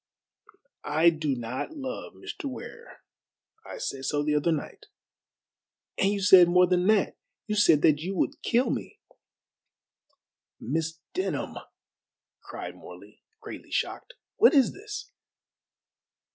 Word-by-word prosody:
"I 160 +3 +4
do 155 -4 -2
not 125 - -5
love 265 -2 -6
Mr. - - -8
Ware. 455 - -9 0.6
I - - -9
said 135 - -4
so 145 +2 0
the 150 0 0
other 150 +3 +2
night." 155 -3 -5 1.1
"And 195 - +3
you 205 -1 -2
said 190 -3 +8
more 180 +1 +5
than 180 0 +1
that. 215 -2 +2 0.3
You 215 - -3
said 205 -8 +4
that 150 -1 +5
you 185 +5 -4
would 290 - -1
kill 240 0 +1
me." - - -5 1.6
"Miss 160 +5 -2 0.2
Denham," 375 - -3 0.9
cried - - -8
Morley, - - -14 0.2
greatly - - -10
shocked, - - -3 0.2
"what 440 - +6
is 270 -3 +4
this?" 425 +4 -8
180 Hz, 125 wpm, -27 LUFS, -, 1.6 s, said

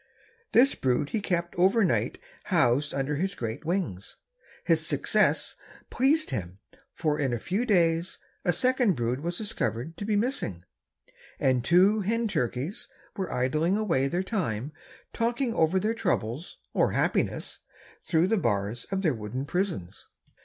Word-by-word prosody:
This 265 +4 +6
brood 130 +2 0
he 220 - 0
kept 170 -3 -1
over 195 +5 +4
night 180 - +1 0.3
housed 145 -5 +2
under 140 +1 -1
his 190 +5 -1
great 115 +3 -4
wings. 160 - -2 0.5
His - - +2
success - - +1 0.4
pleased 300 +5 +2
him, 90 -6 -4 0.3
for 150 -3 -1
in 135 -4 0
a 120 - -1
few 195 - -1
days 170 -4 +2 0.3
a 175 - +3
second 250 -2 +2
brood 120 +2 -1
was 175 +2 -3
discovered 165 - -3
to 205 - -4
be 215 0 +1
missing, 205 - -1 0.8
and 130 -2 +2
two 190 - +5
hen 225 +3 0
turkeys 135 - -2 0.3
were 190 -3 -3
idling 155 +9 +1
away 165 -11 +1
their 175 +6 -1
time 150 - -2 0.4
talking 235 +1 0
over 170 -2 +3
their 215 +4 0
troubles 165 - -2 0.2
or - - +2
happiness - - -1 0.4
through 165 0 +2
the 220 +4 +2
bars 110 - -1
of 195 0 -2
their 160 -6 +3
wooden 115 +4 -4
prisons. 170 - -3
170 Hz, 145 wpm, -27 LUFS, 130-205 Hz, 0.8 s, This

